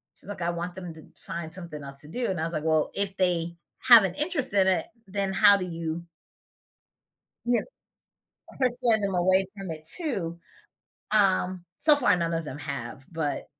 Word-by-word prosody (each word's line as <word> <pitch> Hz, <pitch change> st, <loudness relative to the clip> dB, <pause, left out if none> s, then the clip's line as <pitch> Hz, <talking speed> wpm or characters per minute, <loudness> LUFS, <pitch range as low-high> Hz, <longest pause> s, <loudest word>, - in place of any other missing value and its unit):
She's -, -, -13 dB
like, 205 Hz, -3 st, -6 dB
"I 170 Hz, -, 0 dB
want 175 Hz, +1 st, -4 dB
them 180 Hz, -3 st, -7 dB
to 155 Hz, -, -13 dB, 0.2 s
find 165 Hz, -1 st, -5 dB
something 170 Hz, -5 st, -8 dB
else 140 Hz, 0 st, -6 dB
to 150 Hz, -, -11 dB
do." 240 Hz, +7 st, -2 dB
And 185 Hz, -3 st, -2 dB
I -, -, -1 dB
was 165 Hz, +1 st, -2 dB
like, 155 Hz, -1 st, -2 dB
"Well, 160 Hz, -1 st, +2 dB
if 200 Hz, -1 st, 0 dB
they 175 Hz, -2 st, 0 dB, 0.3 s
have 235 Hz, -4 st, +10 dB
an 190 Hz, -2 st, -1 dB
interest 295 Hz, -, +2 dB
in 195 Hz, -2 st, +4 dB
it, 185 Hz, -1 st, +2 dB, 0.2 s
then 195 Hz, 0 st, -2 dB
how 205 Hz, +1 st, +6 dB
do 185 Hz, -, -3 dB
you" 165 Hz, -1 st, -4 dB, 1.4 s
you 240 Hz, 0 st, +3 dB
know, -, -, -15 dB, 0.9 s
"persuade 240 Hz, -3 st, +1 dB
them 195 Hz, -1 st, -1 dB
away 185 Hz, +2 st, +3 dB
from 195 Hz, -3 st, -6 dB
it 155 Hz, 0 st, -7 dB
too?" 195 Hz, -, -3 dB, 0.7 s
Um, 185 Hz, -3 st, +2 dB, 0.2 s
so 305 Hz, -1 st, +5 dB
far, 250 Hz, -9 st, +4 dB
none 170 Hz, -1 st, -1 dB
of 165 Hz, -1 st, -2 dB
them 145 Hz, 0 st, -7 dB
have, 130 Hz, -2 st, -6 dB
but 160 Hz, -3 st, -2 dB
180 Hz, 190 wpm, -27 LUFS, 165-205 Hz, 1.4 s, have